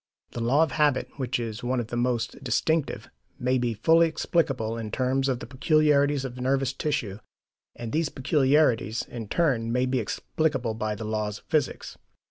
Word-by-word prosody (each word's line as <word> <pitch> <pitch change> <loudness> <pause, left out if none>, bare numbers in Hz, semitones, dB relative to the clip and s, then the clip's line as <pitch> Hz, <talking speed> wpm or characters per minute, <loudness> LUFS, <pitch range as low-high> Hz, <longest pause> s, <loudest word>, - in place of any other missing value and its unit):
The 120 - -5
law 135 +7 +4
of 160 - -1
habit, 145 -3 +2
which 130 -2 -1
is 115 0 -4
one 125 +1 0
of 115 -1 -4
the - - -4
most 120 -1 -1
distinctive, 160 -2 0 0.3
may 125 +1 +1
be 120 -2 -1
fully 165 +9 +4
explicable 140 -8 0
in 115 -2 -5
terms 135 +3 0
of 125 -2 -1
the - - -5
peculiarities 145 +1 +2
of 125 -1 -6
nervous 135 +1 +1
tissue, 125 -9 -2 0.6
and 115 -2 -6
these 160 -1 0
peculiarities, 130 - +2
in 115 -3 -7
turn, 120 -6 +1
may 125 +1 +2
be 130 0 0
explicable 130 +1 -1
by 110 -1 -2
the 110 - -6
laws 105 -1 -2
of - - -18
physics. 155 -5 -2
130 Hz, 175 wpm, -26 LUFS, 115-145 Hz, 0.6 s, law